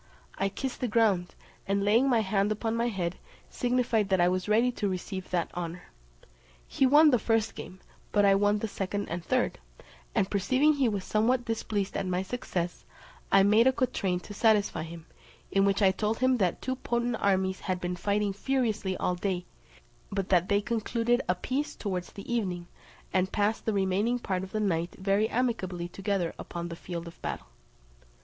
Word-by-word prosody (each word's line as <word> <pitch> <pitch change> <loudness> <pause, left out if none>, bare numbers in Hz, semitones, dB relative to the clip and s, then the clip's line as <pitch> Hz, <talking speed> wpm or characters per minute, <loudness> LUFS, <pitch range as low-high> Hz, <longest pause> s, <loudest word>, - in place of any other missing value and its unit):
I 195 - +1
kissed 260 +5 -5
the 250 - +1
ground, 210 -6 +2 0.3
and 200 0 +1
laying 230 +6 +4
my 235 -3 +4
hand 200 0 +1
upon 225 +1 -1
my 235 +1 +1
head, 185 -6 -3 0.3
signified 245 -4 +1
that 190 -1 +3
I 175 0 +5
was 185 +2 -2
ready 230 +4 +4
to 210 -4 -2
receive 185 0 -5
that 175 -2 -1
honour. 175 0 -5 0.8
He 270 - +2
won 300 +3 +7
the 245 - +3
first 225 0 +1
game, 185 - -9 0.3
but 205 -1 +4
I 195 - +6
won 205 +1 +3
the 220 - -2
second 200 0 -3
and 170 +1 -4
third; - - 0 0.6
and 190 - +2
perceiving 255 +10 +3
he 275 -5 +2
was 200 -3 -2
somewhat 240 +5 +1
displeased 215 -3 -2
at 190 - -1
my 180 +1 0
success, 185 -5 -4 0.5
I 195 - +6
made 215 +5 +5
a - - +6
quatrain 220 -8 -1
to 205 - -9
satisfy 210 -1 +2
him; 165 0 -8 0.5
in 195 0 +3
which 200 +1 +2
I 190 - +6
told 210 +3 -1
him 255 0 +3
that 185 -6 0
two 260 0 -2
potent 240 -1 -1
armies 190 -1 +1
had 185 -1 -2
been 180 0 -3
fighting 200 +2 0
furiously 220 -5 -1
all 180 - 0
day, 180 0 -2 0.7
but 195 -1 -2
that 180 -1 +3
they 200 0 +3
concluded 235 +2 0
a 180 - +3
peace 265 +10 -3
towards 185 -4 -4
the 200 - -10
evening, 180 -7 -1 0.5
and 185 0 +1
passed 210 +1 0
the 220 - +2
remaining 200 +5 +1
part 190 -6 -2
of 190 0 -7
the 215 - -1
night 175 -4 -1
very 200 +3 +1
amicably 190 -8 -1
together 195 -2 -2
upon 170 0 -5
the 170 - -6
field 170 0 -6
of 170 - -12
battle. - - -4
200 Hz, 185 wpm, -29 LUFS, 185-230 Hz, 0.8 s, won